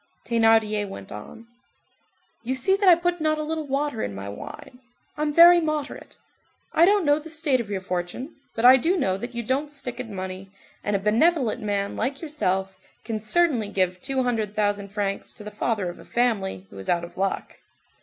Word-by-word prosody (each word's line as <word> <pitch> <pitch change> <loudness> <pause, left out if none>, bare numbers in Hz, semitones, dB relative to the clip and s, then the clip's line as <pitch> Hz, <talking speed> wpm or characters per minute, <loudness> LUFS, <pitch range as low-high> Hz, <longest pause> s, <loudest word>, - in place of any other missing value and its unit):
Thénardier 225 -3 +3
went 100 - -9
on:— 105 - -10 1.0
"You 255 +3 -1
see 265 +10 +3
that 395 -1 +4
I 350 - +9
put 350 0 -1
not 310 0 +1
a 305 - -2
little 315 -1 -3
water 275 -3 -1
in 100 - -3
my 100 +1 -6
wine; 250 - -10 0.4
I'm 300 0 -1
very 345 +3 +8
moderate. 305 -2 -4 0.6
I 330 - +6
don't 400 -1 +3
know 290 +1 +4
the 315 +2 -10
state 305 -5 +1
of 215 - -9
your 195 -2 -3
fortune, 185 - -4 0.2
but 225 - 0
I 255 +1 +9
do 340 +9 +1
know 190 - +1
that 240 +3 -7
you 235 - -2
don't 275 +5 -1
stick 250 -4 -5
at 255 -3 -5
money, 190 -1 -6 0.3
and 205 - 0
a - - +1
benevolent 235 - +2
man 200 -1 -2
like 265 +5 -2
yourself 195 - -2 0.3
can 225 -2 -3
certainly 245 0 +1
give 185 -2 0
two 265 -1 -1
hundred 220 -4 -1
thousand 205 -1 0
francs 200 -1 -3
to 210 - -12
the 210 - -7
father 210 -2 -1
of 175 - -7
a - - -12
family 205 - -1
who 100 - -10
is 95 - -6
out 170 -1 +2
of 170 - -9
luck. 195 0 -3
230 Hz, 200 wpm, -24 LUFS, 200-295 Hz, 1.0 s, I